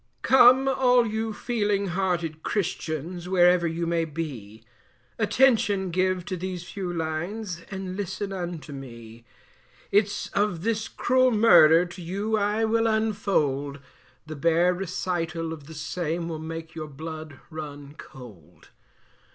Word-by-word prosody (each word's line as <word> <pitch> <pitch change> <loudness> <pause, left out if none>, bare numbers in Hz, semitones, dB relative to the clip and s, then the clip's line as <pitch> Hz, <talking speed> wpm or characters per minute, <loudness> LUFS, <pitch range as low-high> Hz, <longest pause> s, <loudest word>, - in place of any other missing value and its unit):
Come 260 +1 +6
all 250 -2 +4
you 220 0 -2
feeling 205 -3 -1
hearted 175 -4 -1
christians, 175 -2 -3
wherever 180 -1 +4
you 165 +1 -2
may 170 0 +1
be, 135 -10 -6 0.6
Attention 210 -5 +3
give 185 0 0
to 185 - -3
these 180 -1 -5
few 185 0 -5
lines, 170 +4 -4
and 190 -2 -5
listen 200 0 -4
unto 175 -5 -5
me; 115 -4 -10 0.7
Its 205 0 +1
of 200 -4 -1
this 225 0 -1
cruel 255 +1 +2
murder, 180 -8 +6
to 180 +1 -10
you 200 +6 -2
I 210 +1 +1
will 225 +1 +2
unfold, 195 -11 0 0.5
The 155 0 -7
bare 170 +4 +3
recital 170 -3 -3
of 150 -3 -11
the 160 - -10
same 165 +2 -3
will 160 -2 -4
make 160 0 -7
your 155 -1 -6
blood 155 0 -8
run 145 -2 -8
cold. 100 - -14
175 Hz, 130 wpm, -26 LUFS, 160-205 Hz, 0.7 s, Come